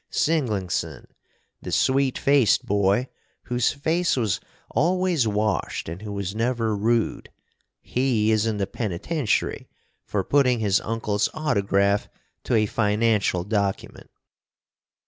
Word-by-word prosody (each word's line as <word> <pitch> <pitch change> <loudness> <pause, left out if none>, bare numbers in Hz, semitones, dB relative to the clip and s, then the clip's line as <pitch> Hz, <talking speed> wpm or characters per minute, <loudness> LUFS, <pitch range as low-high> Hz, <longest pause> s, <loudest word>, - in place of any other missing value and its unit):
Singlingson, 100 - -1 0.6
the - - -6
sweet 135 0 +2
faced 140 -6 +3
boy 100 +5 +1 0.4
whose 120 -2 +1
face 165 +3 0
was 110 -6 0 0.3
always 170 -1 +1
washed 105 +1 -1
and 85 +4 -6
who 105 -1 -6
was 100 -1 -4
never 115 -1 0
rude, 115 +3 0 0.5
he 120 -4 +1
is 110 0 +2
in 110 -2 -1
the 100 - 0
penitentiary 110 - -2 0.3
for 100 -2 -2
putting 130 -1 +3
his 105 -3 +1
uncle's 105 -2 -1
autograph 100 -8 +1 0.4
to - - +1
a 110 -1 +3
financial 105 -3 +1
document. 100 -1 -3
110 Hz, 115 wpm, -24 LUFS, 100-130 Hz, 0.6 s, faced